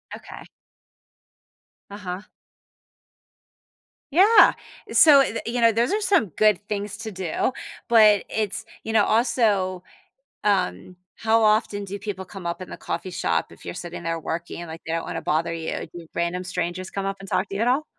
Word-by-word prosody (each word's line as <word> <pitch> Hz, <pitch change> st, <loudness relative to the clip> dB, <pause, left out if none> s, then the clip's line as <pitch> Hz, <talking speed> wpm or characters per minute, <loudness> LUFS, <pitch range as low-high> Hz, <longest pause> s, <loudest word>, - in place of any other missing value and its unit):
Okay. -, -, -11 dB, 1.5 s
Uh-huh. 200 Hz, 0 st, -6 dB, 1.9 s
Yeah. 400 Hz, +8 st, +7 dB, 0.4 s
So, 290 Hz, -3 st, +8 dB
d 230 Hz, -, -3 dB
you 240 Hz, +1 st, -1 dB
know, 230 Hz, -1 st, +5 dB
those 235 Hz, -, +1 dB
are 425 Hz, -, +1 dB
some 390 Hz, -, +3 dB
good 210 Hz, -3 st, +4 dB
things 205 Hz, 0 st, -3 dB
to 225 Hz, -1 st, -6 dB
do, 190 Hz, +5 st, -2 dB, 0.4 s
but 215 Hz, -4 st, +6 dB
it's, 215 Hz, -3 st, -2 dB, 0.2 s
you 220 Hz, -, -3 dB
know, 215 Hz, -2 st, +4 dB
also, 210 Hz, -6 st, +1 dB, 0.6 s
um, 185 Hz, -, 0 dB, 0.2 s
how 225 Hz, 0 st, +2 dB
often 215 Hz, -1 st, +2 dB
do 200 Hz, +1 st, -6 dB
people 195 Hz, -2 st, -5 dB
come 185 Hz, 0 st, -10 dB
up 170 Hz, +2 st, -3 dB
in 185 Hz, -, -8 dB
the -, -, -7 dB
coffee 185 Hz, -, -5 dB
shop 180 Hz, -, -1 dB
if -, -, -16 dB
you're -, -, -6 dB
sitting 175 Hz, -1 st, -7 dB
there 165 Hz, 0 st, -2 dB
working, 170 Hz, +2 st, -5 dB
like, 160 Hz, 0 st, -8 dB
they 165 Hz, -, -3 dB
don't 165 Hz, -, -1 dB
wanna -, -, -5 dB
bother 165 Hz, +2 st, 0 dB
you? 165 Hz, -1 st, -4 dB
Do 170 Hz, -2 st, -10 dB
random 170 Hz, +1 st, -1 dB
strangers 180 Hz, +1 st, -3 dB
come 195 Hz, -1 st, -3 dB
up 195 Hz, -, -2 dB
and 195 Hz, -, -10 dB
talk 190 Hz, -, 0 dB
to 195 Hz, -, -6 dB
you 200 Hz, -, -3 dB
at 240 Hz, -, +2 dB
all? 275 Hz, +5 st, +2 dB
200 Hz, 175 wpm, -24 LUFS, 180-220 Hz, 1.9 s, So